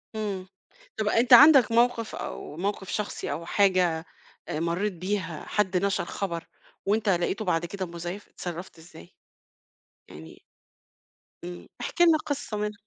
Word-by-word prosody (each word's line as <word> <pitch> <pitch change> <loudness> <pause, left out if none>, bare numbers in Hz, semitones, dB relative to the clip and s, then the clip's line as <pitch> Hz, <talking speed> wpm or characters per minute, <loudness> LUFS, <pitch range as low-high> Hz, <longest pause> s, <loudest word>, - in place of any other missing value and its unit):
امم، 200 -4 -3 0.5
طَب 215 - -1
أنت 240 +4 +4
عندك 270 -3 +9
موقف 235 -1 +2
أو 150 - -7
موقف 195 +1 -3
شخصي 210 -1 -3
أو 170 - -4
حاجة 180 -4 +2 0.4
آآ 150 - -3
مرّيت 175 +5 -1
بيها 185 -2 -4
حد 190 -3 +1
نَشَر 200 - 0
خبر، 170 -4 -4 0.4
وأنت 210 +1 +1
لقيتُه 185 +4 0
بعد 175 -2 +1
كده 190 +2 -4
مزيّف، 175 +3 -7
اتصرّفت 175 0 -7
إزاي؟ 160 - -15 0.9
يعني 80 +1 -12 1.0
امم، 90 -1 -8
احكِ 340 - -3
لنا 335 -2 +7
قصّة 285 -7 -4
منهم. 210 0 -2
195 Hz, 135 wpm, -27 LUFS, 170-215 Hz, 1.0 s, عندك